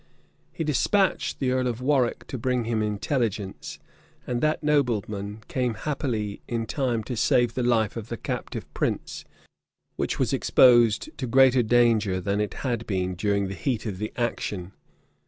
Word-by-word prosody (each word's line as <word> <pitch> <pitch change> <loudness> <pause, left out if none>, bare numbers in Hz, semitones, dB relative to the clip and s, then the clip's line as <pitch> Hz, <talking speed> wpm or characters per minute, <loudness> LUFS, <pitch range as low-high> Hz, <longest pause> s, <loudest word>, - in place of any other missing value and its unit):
He 165 - -4
despatched 190 - +1
the 130 -2 0
earl 130 0 +1
of 120 -1 -2
Warwick 130 -2 +1
to 130 - -6
bring 125 0 0
him 115 -1 -1
intelligence; 105 -1 -2 0.5
and 120 -1 -2
that 155 0 +1
nobleman 110 -7 0
came 125 -3 -1
happily 110 -5 -3
in 115 -1 -2
time 120 -3 -1
to 125 - -5
save 120 +1 +2
the 125 - -2
life 115 -3 +1
of 115 -2 -6
the 115 - -4
captive - - -5
prince - - -3 0.7
which - - -1
was - - 0
exposed 120 -4 +4
to 130 - -2
greater 130 +1 +5
danger 115 -5 +3
than 100 +3 -1
it 105 - -3
had 120 -3 -2
been 95 -2 -1
during 100 +2 0
the 95 - -5
heat 120 +2 -2
of 100 -4 -4
the 105 +1 -3
action. 100 -6 -3
115 Hz, 160 wpm, -25 LUFS, 105-130 Hz, 0.7 s, greater